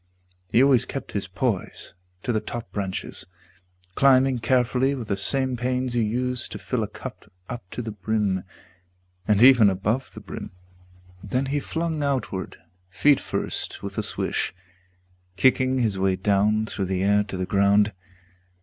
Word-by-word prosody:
He 120 Hz, +5 st, +5 dB
always 135 Hz, -4 st, +5 dB
kept 135 Hz, -, -6 dB
his 100 Hz, -2 st, -3 dB
poise 100 Hz, +1 st, -2 dB, 0.3 s
To 125 Hz, -, 0 dB
the 110 Hz, -, +1 dB
top 120 Hz, -1 st, -6 dB
branches, 95 Hz, -2 st, -4 dB, 0.7 s
climbing 130 Hz, 0 st, +4 dB
carefully 125 Hz, +3 st, +2 dB
With 120 Hz, -5 st, -6 dB
the 100 Hz, -, +1 dB
same 130 Hz, +6 st, +1 dB
pains 125 Hz, +1 st, -1 dB
you 120 Hz, -, +2 dB
use 125 Hz, +3 st, -1 dB
to -, -, -7 dB
fill -, -, -2 dB
a -, -, -1 dB
cup -, -, -10 dB, 0.2 s
Up 120 Hz, -6 st, -7 dB
to 120 Hz, -, -5 dB
the 110 Hz, -, -4 dB
brim, 105 Hz, -2 st, -1 dB, 0.8 s
and 105 Hz, +1 st, +4 dB
even 125 Hz, -5 st, +8 dB
above 105 Hz, +7 st, -1 dB
the -, -, -7 dB
brim. -, -, -8 dB, 0.7 s
Then 125 Hz, +7 st, -1 dB
he 140 Hz, +2 st, 0 dB
flung 160 Hz, +1 st, -2 dB
outward, 130 Hz, -9 st, -2 dB, 0.3 s
feet 145 Hz, +9 st, +4 dB
first, -, -, -4 dB
with -, -, -5 dB
a -, -, +2 dB
swish, -, -, -2 dB, 0.8 s
Kicking 130 Hz, +4 st, +3 dB
his 110 Hz, -6 st, 0 dB
way 95 Hz, 0 st, +2 dB
down 105 Hz, +3 st, +2 dB
through 100 Hz, -2 st, -3 dB
the 95 Hz, 0 st, -1 dB
air 105 Hz, +1 st, +4 dB
to 95 Hz, -2 st, -6 dB
the 90 Hz, -, -1 dB
ground. 100 Hz, +2 st, +3 dB
115 Hz, 160 wpm, -24 LUFS, 100-130 Hz, 0.8 s, even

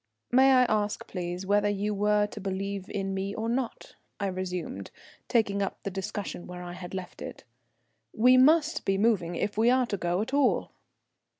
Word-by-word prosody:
"May 265 Hz, +2 st, +6 dB
I 255 Hz, -1 st, +6 dB
ask, 210 Hz, -3 st, 0 dB
please, 180 Hz, 0 st, -5 dB
whether 205 Hz, +1 st, +3 dB
you 205 Hz, +1 st, -1 dB
were 210 Hz, +1 st, +2 dB
to 210 Hz, 0 st, -8 dB
believe 195 Hz, 0 st, -4 dB
in 195 Hz, -1 st, -3 dB
me 195 Hz, +1 st, -3 dB
or 220 Hz, +1 st, -3 dB
not?" 240 Hz, 0 st, -3 dB, 0.3 s
I 200 Hz, -, -1 dB
resumed, 185 Hz, -1 st, -4 dB, 0.4 s
taking 205 Hz, -4 st, +1 dB
up 195 Hz, -, -2 dB
the 200 Hz, -, -3 dB
discussion 195 Hz, -1 st, -5 dB
where 180 Hz, 0 st, -7 dB
I 175 Hz, 0 st, -7 dB
had 180 Hz, 0 st, -8 dB
left 185 Hz, -1 st, -7 dB
it. -, -, -8 dB, 0.7 s
"We 250 Hz, +3 st, +5 dB
must 305 Hz, +5 st, +4 dB
be 195 Hz, 0 st, +1 dB
moving 195 Hz, -5 st, +1 dB
if 210 Hz, +4 st, -2 dB
we 230 Hz, +2 st, +5 dB
are 255 Hz, 0 st, +4 dB
to 205 Hz, -, -3 dB
go 175 Hz, +1 st, 0 dB
at 230 Hz, -, -8 dB
all." 280 Hz, -3 st, +2 dB
205 Hz, 185 wpm, -28 LUFS, 190-230 Hz, 0.7 s, May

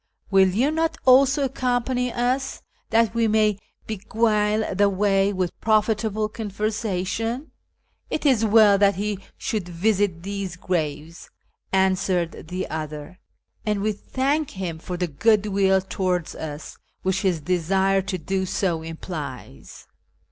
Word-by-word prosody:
Will 190 Hz, -1 st, +6 dB
you 240 Hz, +11 st, +1 dB
not 320 Hz, 0 st, 0 dB
also 270 Hz, +2 st, +5 dB
accompany 250 Hz, -1 st, -1 dB
us, 255 Hz, +3 st, -1 dB, 0.3 s
that 225 Hz, -1 st, +3 dB
we 230 Hz, -1 st, +2 dB
may 215 Hz, -2 st, +2 dB, 0.3 s
beguile 215 Hz, 0 st, 0 dB
the 200 Hz, +1 st, +3 dB
way 195 Hz, 0 st, +2 dB
with 185 Hz, -3 st, -1 dB
profitable 215 Hz, -1 st, +1 dB
conversation? 215 Hz, +3 st, -3 dB, 0.2 s
" -, -, -49 dB
" -, -, -44 dB
It 310 Hz, -, -3 dB
is 255 Hz, -6 st, +4 dB
well 210 Hz, -2 st, +6 dB
that 200 Hz, 0 st, +4 dB
he 205 Hz, 0 st, -2 dB, 0.2 s
should 205 Hz, -5 st, -3 dB
visit 185 Hz, -1 st, 0 dB
these 195 Hz, -2 st, -4 dB
graves," 165 Hz, -3 st, -3 dB, 0.4 s
answered 185 Hz, -3 st, 0 dB
the 185 Hz, +2 st, -3 dB
other, 155 Hz, +2 st, -6 dB, 0.2 s
" -, -, -45 dB
and 210 Hz, -1 st, +1 dB
w^e 215 Hz, 0 st, 0 dB
thank 275 Hz, +7 st, -1 dB
liim 175 Hz, -4 st, -5 dB
for 180 Hz, 0 st, -5 dB
the 180 Hz, -, 0 dB
good 210 Hz, +7 st, +2 dB
will 195 Hz, -2 st, +2 dB
towards 185 Hz, -2 st, -2 dB
us 150 Hz, -1 st, -7 dB, 0.2 s
which 190 Hz, +1 st, 0 dB
his 185 Hz, -5 st, +1 dB
desire 190 Hz, +4 st, +1 dB
to 190 Hz, 0 st, -3 dB
do 190 Hz, +2 st, -2 dB
so 175 Hz, -4 st, -1 dB
implies. 155 Hz, -, -8 dB
200 Hz, 140 wpm, -23 LUFS, 180-220 Hz, 0.4 s, Will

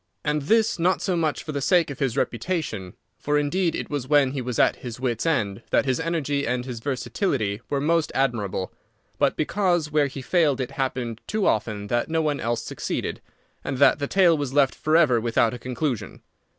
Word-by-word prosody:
And 150 Hz, 0 st, 0 dB
this 220 Hz, +7 st, +2 dB
not 180 Hz, +3 st, +2 dB
so 185 Hz, -3 st, -1 dB
much 160 Hz, -3 st, -1 dB
for 155 Hz, -, -5 dB
the 140 Hz, -1 st, -3 dB
sake 170 Hz, 0 st, +3 dB
of 140 Hz, -, -8 dB
his 135 Hz, -5 st, -1 dB
reputation—for, 145 Hz, -, -3 dB
indeed, 165 Hz, +4 st, +1 dB
it -, -, -5 dB
was 140 Hz, -3 st, -3 dB
when 145 Hz, -2 st, +4 dB
he 135 Hz, -1 st, -3 dB
was 125 Hz, -1 st, -4 dB
at -, -, +3 dB
his 120 Hz, -1 st, -7 dB
wits' 125 Hz, +3 st, -1 dB
end 105 Hz, -11 st, 0 dB
that -, -, +2 dB
his 130 Hz, +1 st, 0 dB
energy 155 Hz, -4 st, -1 dB
and 125 Hz, +1 st, -1 dB
his 125 Hz, -3 st, -5 dB
versatility 125 Hz, -, -2 dB
were 140 Hz, -, 0 dB
most 160 Hz, +2 st, +1 dB
admirable—but 110 Hz, -8 st, -2 dB
because 175 Hz, -2 st, +1 dB
where 150 Hz, -1 st, +3 dB
he 135 Hz, -1 st, -8 dB
failed 155 Hz, -6 st, +2 dB
it 130 Hz, 0 st, -3 dB
happened 130 Hz, -4 st, -3 dB
too 215 Hz, -2 st, 0 dB
often 105 Hz, -1 st, 0 dB
that 120 Hz, +6 st, -1 dB
no 160 Hz, 0 st, +1 dB
one 150 Hz, -2 st, 0 dB
else 115 Hz, 0 st, -1 dB
succeeded, -, -, -4 dB, 0.4 s
and 135 Hz, -, -3 dB
that 140 Hz, +2 st, +5 dB
the 140 Hz, -, -2 dB
tale 180 Hz, -2 st, +4 dB
was 145 Hz, -3 st, -3 dB
left 140 Hz, -2 st, +4 dB
forever 155 Hz, -7 st, +3 dB
without 115 Hz, 0 st, +2 dB
a 125 Hz, -, -6 dB
conclusion. 125 Hz, 0 st, -3 dB
140 Hz, 190 wpm, -24 LUFS, 120-160 Hz, 0.4 s, that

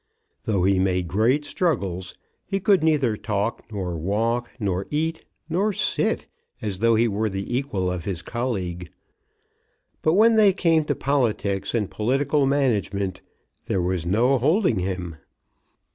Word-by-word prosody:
Though 100 Hz, -5 st, +1 dB
he 95 Hz, 0 st, +3 dB
made 90 Hz, -2 st, +1 dB
great 115 Hz, -, +2 dB
struggles 95 Hz, -, -2 dB, 0.3 s
he 195 Hz, 0 st, -2 dB
could 195 Hz, -1 st, +3 dB
neither 145 Hz, -8 st, +2 dB
talk, 105 Hz, +1 st, -2 dB
nor 95 Hz, -4 st, -3 dB
walk, 115 Hz, +8 st, -1 dB
nor 95 Hz, -3 st, -1 dB
eat, 160 Hz, +2 st, -2 dB, 0.2 s
nor 190 Hz, +6 st, +1 dB
sit, -, -, 0 dB, 0.3 s
as 100 Hz, -4 st, -4 dB
though 115 Hz, +1 st, +4 dB
he 115 Hz, +2 st, +3 dB
were 110 Hz, +1 st, -1 dB
the 95 Hz, +4 st, -4 dB
equal 100 Hz, -9 st, -1 dB
of 90 Hz, -2 st, -4 dB
his 95 Hz, -4 st, -4 dB
colleague. 95 Hz, -8 st, -3 dB, 1.1 s
But 155 Hz, -, +2 dB
when 225 Hz, +2 st, +5 dB
they 205 Hz, -3 st, +6 dB
came 165 Hz, -4 st, +2 dB
to -, -, 0 dB
politics 115 Hz, -8 st, 0 dB
and 105 Hz, -4 st, 0 dB
political 135 Hz, +7 st, +1 dB
management, 105 Hz, -9 st, 0 dB, 0.5 s
there 95 Hz, -, 0 dB
was 90 Hz, -1 st, -1 dB
no 120 Hz, +9 st, +2 dB
holding 155 Hz, -, +2 dB
him. 90 Hz, -3 st, -4 dB
110 Hz, 145 wpm, -24 LUFS, 95-140 Hz, 1.1 s, they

